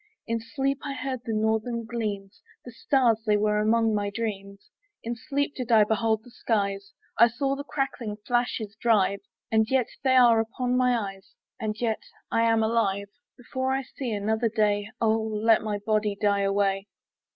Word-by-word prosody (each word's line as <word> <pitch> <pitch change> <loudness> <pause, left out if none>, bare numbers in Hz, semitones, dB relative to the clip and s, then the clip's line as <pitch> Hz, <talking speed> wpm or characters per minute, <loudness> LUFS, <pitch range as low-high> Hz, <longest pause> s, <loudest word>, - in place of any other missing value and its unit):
In 230 0 -1
sleep 270 +4 -2
I 280 - -3
heard 260 -1 -3
the 225 - -2
northern 220 +2 0
gleams; 210 -4 -4 0.2
The 245 - -8
stars 235 -2 +2
they 210 -2 +2
were 210 0 +1
among 225 +1 +2
my 205 -1 0
dreams; 200 -2 -5 0.3
In 235 +1 -3
sleep 285 +4 -2
did 250 -2 -5
I 220 -2 +7
behold 220 +1 0
the 245 - -16
skies, 200 -4 -2 0.3
I 235 - +9
saw 275 +4 -1
the 285 - -6
crackling 270 -7 -3
flashes 240 -3 -1
drive; 200 -4 +3 0.3
And 220 0 +3
yet 260 -3 +1
they 260 -1 +3
are 240 -3 +6
upon 245 +3 -1
my 250 -1 +3
eyes, 195 -3 -7 0.2
And 215 0 -3
yet 225 -3 -1 0.3
I 230 - +2
am 225 -1 +3
alive. 200 -3 0 0.3
Before 260 +1 -2
I 270 0 -1
see 260 -1 -6
another 220 +2 0
day, 210 -1 +1
Oh 220 0 +2
let 220 0 +2
my 210 -1 -2
body 210 0 0
die 200 -1 +2
away! 195 0 +1
225 Hz, 175 wpm, -26 LUFS, 210-245 Hz, 0.3 s, I